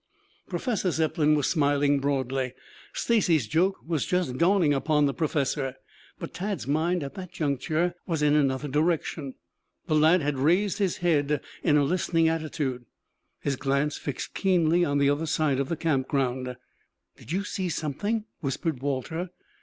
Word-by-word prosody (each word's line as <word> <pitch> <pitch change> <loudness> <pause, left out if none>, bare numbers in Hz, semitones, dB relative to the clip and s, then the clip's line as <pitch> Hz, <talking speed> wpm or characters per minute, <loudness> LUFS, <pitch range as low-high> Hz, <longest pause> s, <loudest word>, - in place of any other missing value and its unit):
Professor 215 -7 -1
Zepplin 155 -2 +2
was 145 -3 +1
smiling 145 -2 +2
broadly. 135 -2 -1 0.4
Stacy's 175 - +2
joke 185 - +2
was 160 -3 0
just 180 -8 0
dawning 170 -4 +4
upon 150 +1 +2
the 140 - +1
professor. 140 -3 -1 0.4
But - - -7
Tad's 200 +1 -3
mind 160 +4 +1
at 140 - -6
that 185 -2 -8
juncture 155 +2 0
was 160 -4 -1
in 145 0 +4
another 140 -1 +1
direction. 150 -1 -1 0.5
The - - -1
lad 155 +2 +5
had 145 -2 -1
raised 180 +9 +2
his 195 -3 0
head 150 -3 +2 0.2
in 150 -3 +3
a 145 - +4
listening 165 +1 +2
attitude, 145 -6 -3 0.5
his 140 - -1
glance 140 +2 0
fixed 140 -3 -5
keenly 175 -3 +3
on 145 -4 +1
the 140 0 +3
other 155 +3 -1
side 150 -3 +1
of 140 - -1
the 170 - -1
camp 145 -5 0
ground. 125 -2 -1 0.6
"Did - - -12
you 190 +3 0
see 190 -2 -3
something?" 205 +9 -2
whispered 140 -1 -2
Walter. 145 +6 -2
150 Hz, 155 wpm, -27 LUFS, 140-170 Hz, 0.6 s, lad